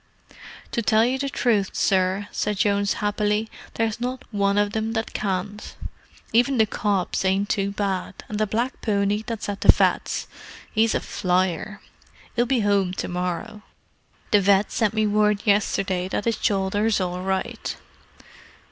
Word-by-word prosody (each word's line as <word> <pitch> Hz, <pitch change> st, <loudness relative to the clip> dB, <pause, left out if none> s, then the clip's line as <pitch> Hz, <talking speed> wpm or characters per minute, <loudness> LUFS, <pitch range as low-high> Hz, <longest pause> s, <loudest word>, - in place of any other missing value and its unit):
"To 235 Hz, -, 0 dB
tell 220 Hz, 0 st, +4 dB
you 260 Hz, +2 st, 0 dB
the 280 Hz, 0 st, -1 dB
truth, 225 Hz, -6 st, +1 dB
sir," 190 Hz, +1 st, +1 dB
said 210 Hz, -1 st, -1 dB
Jones 200 Hz, -1 st, +2 dB
happily, 210 Hz, +1 st, 0 dB, 0.2 s
"there's 225 Hz, 0 st, -1 dB
not 255 Hz, +1 st, -3 dB
one 200 Hz, -1 st, +1 dB
of 205 Hz, 0 st, +2 dB
them 220 Hz, 0 st, -2 dB
that 225 Hz, -1 st, -3 dB
can't. 200 Hz, +1 st, -3 dB, 0.6 s
Even 245 Hz, +3 st, +3 dB
the 220 Hz, -, +5 dB
cobs 200 Hz, -4 st, -1 dB
ain't 195 Hz, +2 st, +1 dB
too 195 Hz, -1 st, 0 dB
bad; 200 Hz, -2 st, -2 dB
and 210 Hz, -, -4 dB
the 215 Hz, -, +1 dB
black 235 Hz, +5 st, -2 dB
pony 205 Hz, -1 st, +1 dB
that's 225 Hz, -1 st, -5 dB
at 200 Hz, -1 st, -4 dB
the -, -, -2 dB
vet.'s, -, -, 0 dB, 0.5 s
'e's 220 Hz, 0 st, +3 dB
a -, -, 0 dB
flyer. 185 Hz, +2 st, -1 dB, 0.5 s
'E'll 240 Hz, +1 st, +2 dB
be 245 Hz, -3 st, +1 dB
'ome 200 Hz, -3 st, +2 dB
to -, -, -3 dB
morrow; 180 Hz, +4 st, -3 dB, 0.7 s
the 205 Hz, -3 st, +5 dB
vet. 200 Hz, +1 st, +3 dB
sent 220 Hz, -1 st, 0 dB
me 215 Hz, 0 st, +2 dB
word 210 Hz, 0 st, +2 dB
yesterday 195 Hz, -3 st, +1 dB
that 195 Hz, -, -3 dB
'is 230 Hz, -2 st, 0 dB
shoulder's 205 Hz, +2 st, +1 dB
all 180 Hz, -1 st, -2 dB
right. 190 Hz, 0 st, -3 dB
205 Hz, 155 wpm, -24 LUFS, 195-220 Hz, 0.7 s, the